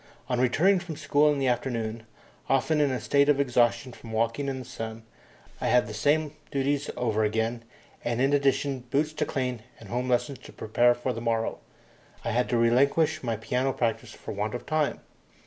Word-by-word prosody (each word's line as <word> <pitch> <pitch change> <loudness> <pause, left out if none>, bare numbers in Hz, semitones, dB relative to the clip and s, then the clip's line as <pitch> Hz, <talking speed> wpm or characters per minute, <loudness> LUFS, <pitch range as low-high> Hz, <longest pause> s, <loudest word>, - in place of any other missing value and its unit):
On 125 -1 0
returning 170 +10 +4
from 175 -3 -7
school 150 0 +3
in 145 - 0
the 135 -1 0
afternoon, 115 -3 -2 0.4
often 150 +3 +2
in 145 - +3
a 130 -1 -1
state 140 0 +3
of 145 -1 +4
exhaustion 120 -1 +2
from 115 - -11
walking 115 +5 0
in 135 - -1
the 130 - -6
blazing - - -12
sun, 110 0 -6 0.6
I - - 0
had 125 -3 +4
the 105 - -7
same 145 +7 +1 0.2
duties 140 0 0
over 110 -3 +1
again, 110 +2 -1 0.4
and 120 0 -1
in 135 +2 +3
addition 140 -1 +2
boots 140 +5 -1
to - - -1
clean 125 -4 -2 0.2
and - - -12
home 125 +1 -2
lessons 125 +1 0
to - - -13
prepare 120 +3 +3
for 125 +1 -2
the 115 - -6
morrow. 115 -1 -1 0.7
I - - 0
had 125 +2 +1
to 120 - +2
relinquish 140 +7 +3
my 115 -3 -1
piano 125 +4 -1
practice 115 -2 -1
for - - -8
want 105 +2 -2
of 120 - -6
time. 155 -1 0
125 Hz, 200 wpm, -27 LUFS, 115-140 Hz, 0.7 s, returning